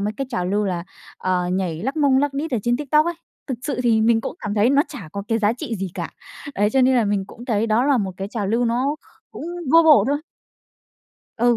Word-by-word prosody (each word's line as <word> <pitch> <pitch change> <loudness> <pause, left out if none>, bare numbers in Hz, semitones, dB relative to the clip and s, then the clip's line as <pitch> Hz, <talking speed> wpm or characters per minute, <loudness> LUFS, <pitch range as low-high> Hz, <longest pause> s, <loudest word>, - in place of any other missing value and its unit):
mấy 205 +1 -1
cái 275 - -3
trào 180 -7 -1
lưu 205 +2 0
là, 180 -3 -2 0.3
ờ, 180 -1 0
nhảy 180 -3 -2
lắc 270 +7 -2
mông 280 -3 +4
lắc 285 0 0
đít 310 +3 -3
ở 245 - 0
trên 240 0 +1
TikTok 300 +3 +2
ấy, 345 - -1 0.3
thực 260 -5 -4
sự 285 -3 -2
thì 230 -3 +3
mình 225 0 +3
cũng - - -5
cảm 205 0 -3
thấy 215 +4 +3
nó 280 +1 +4
chả 210 - -9
có 200 - -4
cái 225 - +1
giá 210 0 +2
trị 240 0 -5
gì 190 -1 -4
cả. - - -4 0.4
Đấy, 205 +1 +2
cho 265 - +3
nên 260 +1 +4
là 235 - +3
mình 200 -1 0
cũng 235 - -12
thấy 225 -3 0
đó 230 +3 +2
là 280 -3 +3
một 195 -2 -1
cái 195 +1 -5
trào 210 -3 -3
lưu 230 +4 +1
nó 255 +5 0
kh - - -34 0.3
cũng - - -7 0.3
vô 330 0 +8
bổ 310 -3 +6
thôi. 290 +1 0 1.2
Ừ, 240 0 +3
235 Hz, 260 wpm, -22 LUFS, 205-275 Hz, 1.2 s, vô